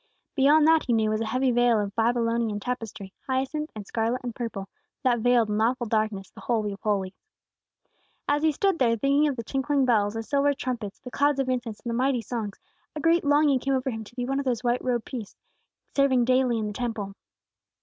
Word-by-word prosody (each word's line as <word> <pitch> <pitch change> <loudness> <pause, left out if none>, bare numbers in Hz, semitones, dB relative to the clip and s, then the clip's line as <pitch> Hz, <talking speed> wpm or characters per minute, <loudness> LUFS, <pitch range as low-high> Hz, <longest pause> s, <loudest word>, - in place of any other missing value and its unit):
Beyond 295 +2 +5
that 320 0 +4
he 240 - +2
knew 220 -1 +2
was 215 +1 -1
a 225 - -2
heavy 255 +3 +1
veil 240 -2 +3
of 200 -1 -3
Babylonian 230 -2 +1
tapestry, 215 -4 -5
hyacinth 270 +4 -1
and 210 -2 -7
scarlet 230 +4 -1
and 240 -2 -4
purple, 225 -5 -5 0.4
that 245 -2 +2
veiled 240 -1 +3
in 210 +1 0
awful 240 +2 +1
darkness 215 -3 -1
the - - -13
Holy 220 -4 0
of 200 - -12
Holies. 200 -3 -1 1.1
As 290 +1 +2
he 315 0 +3
stood 385 +4 0
there 230 -3 +3
thinking 280 +5 +3
of 285 - -1
the 230 - -5
tinkling 270 +2 0
bells, 210 -4 +2
the 225 - -3
silver 285 +3 +1
trumpets, 240 -7 -4
the 250 - -9
clouds 285 +1 +2
of 265 -1 0
incense, 245 -4 -3
and 240 - -5
the - - -2
mighty 250 0 +1
songs, 220 -5 -4 0.4
a - - -3
great 330 +3 +3
longing 290 -2 +3
came 270 +2 0
over 260 0 -1
him 225 -1 -5
to 235 - -16
be 245 -1 -2
one 270 +2 -1
of 280 - -3
those 250 -2 -1
white 240 0 0
robed 240 -3 -1
priests, 235 -7 -7 0.6
serving 265 -3 +3
daily 255 -1 +2
in 220 - -2
the 210 - -4
Temple. 220 -4 -4
245 Hz, 215 wpm, -26 LUFS, 220-270 Hz, 1.1 s, Beyond